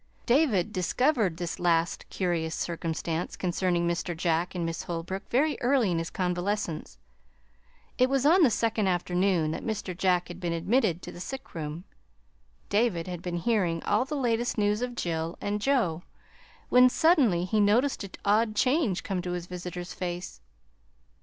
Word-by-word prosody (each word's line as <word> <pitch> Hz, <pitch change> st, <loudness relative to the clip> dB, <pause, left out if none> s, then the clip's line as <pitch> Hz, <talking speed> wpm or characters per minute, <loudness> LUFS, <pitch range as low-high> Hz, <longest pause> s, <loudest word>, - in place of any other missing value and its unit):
David 235 Hz, -, +2 dB
discovered 210 Hz, -, +1 dB
this 175 Hz, -1 st, -4 dB
last 170 Hz, -1 st, +1 dB
curious 170 Hz, -3 st, -1 dB
circumstance 165 Hz, 0 st, -3 dB
concerning 175 Hz, -1 st, 0 dB
Mr. 170 Hz, 0 st, -2 dB
Jack 170 Hz, +1 st, 0 dB
and 175 Hz, -2 st, -1 dB
Miss 165 Hz, 0 st, -3 dB
Holbrook 175 Hz, +3 st, -5 dB
very 290 Hz, +4 st, +1 dB
early 245 Hz, -5 st, +3 dB
in 165 Hz, -, 0 dB
his 165 Hz, -, -3 dB
convalescence. 180 Hz, -1 st, -2 dB, 1.0 s
It 255 Hz, +1 st, +4 dB
was 270 Hz, 0 st, +1 dB
on 345 Hz, +5 st, +6 dB
the 295 Hz, -, +6 dB
second 225 Hz, -2 st, 0 dB
afternoon 180 Hz, -2 st, +1 dB
that -, -, -4 dB
Mr. 210 Hz, -5 st, -3 dB
Jack 180 Hz, -1 st, +1 dB
had 175 Hz, 0 st, -8 dB
been 175 Hz, -2 st, -2 dB
admitted 180 Hz, 0 st, +1 dB
to -, -, -7 dB
the -, -, -11 dB
sick 265 Hz, +9 st, -7 dB
room. 155 Hz, +1 st, -5 dB, 0.8 s
David 200 Hz, -6 st, +1 dB
had 180 Hz, -2 st, -6 dB
been 175 Hz, -1 st, -3 dB
hearing 175 Hz, -4 st, 0 dB
all -, -, +2 dB
the 300 Hz, +2 st, -4 dB
latest 240 Hz, -2 st, 0 dB
news 210 Hz, +1 st, +1 dB
of 250 Hz, -1 st, -3 dB
Jill 165 Hz, -3 st, -2 dB
and 205 Hz, +1 st, -2 dB
Joe, 210 Hz, -, +1 dB, 0.7 s
when 250 Hz, 0 st, +7 dB
suddenly 255 Hz, -, +3 dB
he 215 Hz, +3 st, 0 dB
noticed 225 Hz, +6 st, +2 dB
an 200 Hz, -, -7 dB, 0.2 s
odd 215 Hz, +2 st, +2 dB
change 255 Hz, -, +1 dB
come 190 Hz, -2 st, -2 dB
to 180 Hz, 0 st, -4 dB
his 175 Hz, -1 st, -4 dB
visitor's 180 Hz, 0 st, -6 dB
face. 175 Hz, 0 st, -5 dB
185 Hz, 160 wpm, -28 LUFS, 175-230 Hz, 1.0 s, when